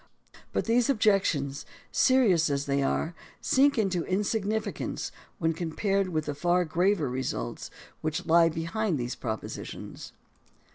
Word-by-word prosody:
But - - -1
these 235 +2 +2
objections, 195 - +2 0.3
serious 205 - +4
as 140 0 -1
they 140 0 +1
are, 160 +4 0 0.3
sink 275 +1 +3
into 190 -6 +1
insignificance 210 +2 -2 0.3
when 165 -1 +1
compared 190 +4 -1
with 155 -3 -1
the 145 - -2
far 175 +4 +2
graver 175 +1 +1
results 130 +1 -3 0.3
which 155 +3 -2
lie 165 0 +5
behind 170 +3 -1
these 125 -1 -3
propositions. 110 -3 -6
175 Hz, 125 wpm, -28 LUFS, 155-205 Hz, 0.3 s, lie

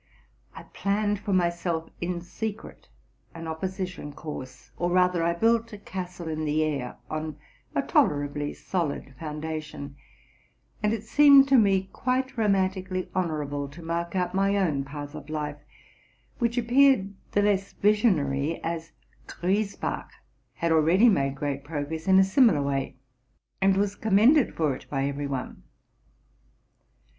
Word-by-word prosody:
I - - -9
planned 205 +1 -1
for 205 0 -4
myself 170 -2 0
in 175 0 -2
secret 215 +5 -6 0.5
an 165 0 -7
opposition 180 -1 -4
course, 145 -5 -8
or 175 - -1
rather 180 -1 +3
I 170 +1 +2
built 230 +4 +2
a - - -6
castle 180 -3 -7
in 155 0 -3
the 155 +1 +1
air, 140 -5 -3
on 155 -1 -4 0.4
a - - +1
tolerably 145 0 +1
solid 155 -6 -3
foun 155 -1 -6
dation; 155 -3 -5 0.9
and 210 0 +2
it 220 -1 -2
seemed 280 -2 +7
to 270 - +5
me 195 -5 +4
quite 260 +1 -1
romantically 190 -3 0
honorable 150 -5 -2
to 160 +5 -12
mark 170 +2 -3
out 180 -1 0
my 195 +1 +2
own 155 -8 +1
path 145 +1 -8
of 155 - -9
life, 150 -1 -4 0.8
which 235 0 0
appeared 245 -4 +4 0.2
the 205 - +3
less 200 -1 +1
vision 210 -1 +3
ary, 140 +2 -1
as 165 0 -4 0.3
Griesbach 200 +3 -2 0.4
had 170 0 -1
already 165 +9 +5
made 135 -8 +1
great 140 0 -3
progress 155 +2 -5
in 190 0 +6
a 190 - +7
simi 225 +5 +5
lar 145 -2 0
way, 140 -1 -2 0.7
and 195 0 +4
was 200 0 +1
commended 225 +8 +4
for 150 -5 +1
it - - -13
by 135 -1 -1
every 140 +1 -2
one. 135 -2 -5
175 Hz, 145 wpm, -26 LUFS, 150-200 Hz, 0.9 s, seemed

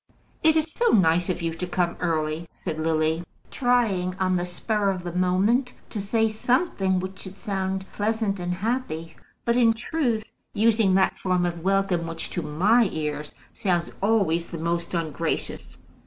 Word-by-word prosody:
"It 315 0 +5
is 315 0 +1
so 480 - -1
nice 175 -3 +4
of 180 -1 -2
you 165 -1 -1
to 180 +2 -4
come 175 -1 0
early," 160 -1 -1
said 155 - -5
Lily, 160 0 +1 0.3
trying 220 -8 +1
on 185 -1 +2
the 175 0 0
spur 200 +3 -1
of 185 -2 -2
the 175 - -4
moment 195 +8 +2 0.2
to 210 - -3
say 225 +3 +2
something 215 - +1
which 190 +1 -6
should 190 0 -9
sound 190 -2 -2
pleasant 210 -2 -1
and 175 0 -2
happy, 185 -4 -2 0.3
but 235 - +2
in 235 -2 +5
truth 235 -2 -2 0.2
using 215 -3 +4
that 190 0 +2
form 180 -1 +1
of 170 -1 -3
welcome 195 -3 +1
which 165 0 -5
to 175 - -2
my 190 +9 +3
ears 150 -1 -4 0.2
sounds 175 -6 0
always 195 -6 +2
the 170 - -6
most 170 +2 -2
ungracious. 165 -1 -3
185 Hz, 165 wpm, -25 LUFS, 170-220 Hz, 0.3 s, It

